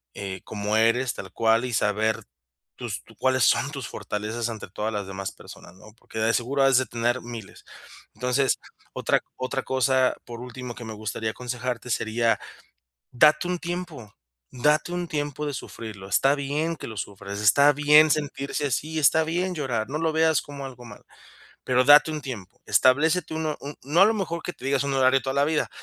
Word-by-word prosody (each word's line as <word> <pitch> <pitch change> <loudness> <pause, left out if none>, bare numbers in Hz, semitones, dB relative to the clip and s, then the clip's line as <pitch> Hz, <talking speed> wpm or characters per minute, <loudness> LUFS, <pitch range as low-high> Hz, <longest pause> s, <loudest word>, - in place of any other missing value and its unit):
eh, 95 -2 -5
como 105 0 -3
eres, 115 +3 +2
tal 95 -1 -9
cual 115 +2 +2
y 125 - -4
saber 105 +2 +1 0.5
tus - - -6
tu - - -18
¿cuáles 130 -2 +2
son 135 +5 +2
tus 135 -5 -6
fortalezas 110 +3 -4
ante 110 -3 -7
todas 110 +3 -3
las 100 -2 -3
demás 95 0 -5
personas, - - -13
no? 105 +3 -16
Porque, 110 - -8
de 115 +1 +2
seguro 135 +3 +1
has 135 -1 +5
de 130 - +2
tener 120 +2 -1
miles. 115 -4 -9 0.5
Entonces, 125 +2 +1 0.3
otra - - +1 0.2
otra 130 +1 -3
cosa, 130 0 +2
por 120 0 -8
último, 125 -1 -7
que 120 - -8
me 110 - -6
gustaría 110 +1 -3
aconsejarte, 125 0 -4
sería, 115 -1 +1 0.7
date 155 +7 +4
un 180 0 -1
tiempo, 170 - -6 0.4
date 150 +6 +1
un 175 -1 -2
tiempo 145 -1 -3
de 145 - -3
sufrirlo, 105 -7 -8
está 135 +8 +3
bien 150 +4 -2
que - - -8
lo 110 - -8
sufras, 100 +1 -6
está 140 +8 +6
bien 150 +2 +6
sentirse 145 -1 -1
así, 155 +5 -2
está 160 +3 +4
bien 180 +3 -1
llorar, 120 -6 -2
no 150 - -2
lo 165 -1 +1
veas 160 -2 +3
como 140 -1 -8
algo 125 -2 -10
mal, 105 -3 -12 0.6
pero 125 0 +3
date 150 +2 +7
un 155 -1 -4
tiempo. 115 -9 -8
Establécete 160 +6 +3
un 160 0 -2
ho 150 - -2 0.3
no 150 +7 +2
a 195 - +9
lo 220 - +3
mejor 180 -5 -3
que 175 - -4
te - - -17
digas 140 0 +1
un 140 -1 -1
horario 130 0 +4
toda 135 0 -3
la 140 +1 +3
vida, 155 0 0
130 Hz, 190 wpm, -25 LUFS, 115-150 Hz, 0.7 s, a